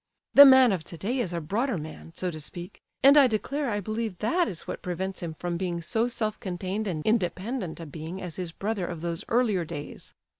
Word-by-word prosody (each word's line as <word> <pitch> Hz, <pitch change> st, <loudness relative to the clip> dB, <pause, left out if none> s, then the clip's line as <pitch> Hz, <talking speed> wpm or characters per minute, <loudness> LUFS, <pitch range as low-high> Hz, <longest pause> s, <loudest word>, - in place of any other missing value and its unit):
The 285 Hz, -, +11 dB
man 260 Hz, -3 st, +7 dB
of 180 Hz, -5 st, -1 dB
today 205 Hz, +12 st, -3 dB
is 195 Hz, -8 st, -1 dB
a 170 Hz, -, -2 dB
broader 210 Hz, -, -1 dB
man, 155 Hz, +1 st, -8 dB
so 180 Hz, -1 st, -2 dB
to 155 Hz, -, -7 dB
speak—and 195 Hz, -, +1 dB
I 280 Hz, -3 st, +8 dB
declare 270 Hz, +5 st, -1 dB
I 205 Hz, -2 st, -1 dB
believe 215 Hz, -1 st, -3 dB
that 340 Hz, -, +1 dB
is 170 Hz, -, -5 dB
what -, -, -6 dB
prevents 185 Hz, +2 st, -4 dB
him 165 Hz, -2 st, -5 dB
from 175 Hz, +1 st, -3 dB
being 175 Hz, -1 st, -2 dB
so 225 Hz, +8 st, 0 dB
self 215 Hz, -3 st, -2 dB
contained 190 Hz, +3 st, -3 dB
and 160 Hz, -5 st, -3 dB
independent 205 Hz, -2 st, -1 dB
a 165 Hz, -, -6 dB
being 160 Hz, +4 st, -7 dB
as 180 Hz, -4 st, -6 dB
his 180 Hz, -3 st, -4 dB
brother 200 Hz, 0 st, -3 dB
of 170 Hz, -3 st, -6 dB
those 170 Hz, -1 st, -3 dB
earlier 225 Hz, -7 st, +2 dB
days. 155 Hz, -3 st, -8 dB
190 Hz, 210 wpm, -27 LUFS, 170-225 Hz, -, The